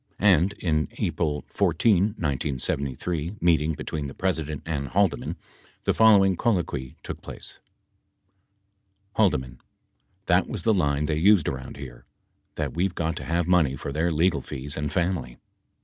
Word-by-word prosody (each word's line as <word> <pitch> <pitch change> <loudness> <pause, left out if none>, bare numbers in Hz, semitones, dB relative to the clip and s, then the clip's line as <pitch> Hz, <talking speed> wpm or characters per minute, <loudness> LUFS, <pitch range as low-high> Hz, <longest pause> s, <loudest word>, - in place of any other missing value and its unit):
25 100 0 +5
And 95 +4 0
in 85 -6 -1
an 75 - 0
April 75 -3 -1
14, 100 -6 +3
1973, 70 - -2
meeting 80 -2 +2
between 75 0 -4
the 70 - -9
President 80 -6 -2
and 75 -4 -2
Haldeman, 95 0 0 0.5
the - - +2
following 100 -4 +6
colloquy 85 - -1
took - - -6
place: - - -9 1.6
H. 105 -4 +6 0.9
That - - +3
was - - -5
the 110 - +3
line 75 -5 +1
they 75 0 0
used 95 -2 +5
around 65 0 -5
here. 60 -4 -10 0.5
That - - -3
we've 90 +2 -1
got 80 -1 -1
to - - -6
have 85 0 0
money 85 -7 +3
for 70 - -6
their 80 +4 0
legal 80 +2 +2
fees 70 +2 -6
and 75 -1 -3
family. 85 -9 -1
80 Hz, 150 wpm, -25 LUFS, 70-90 Hz, 1.6 s, following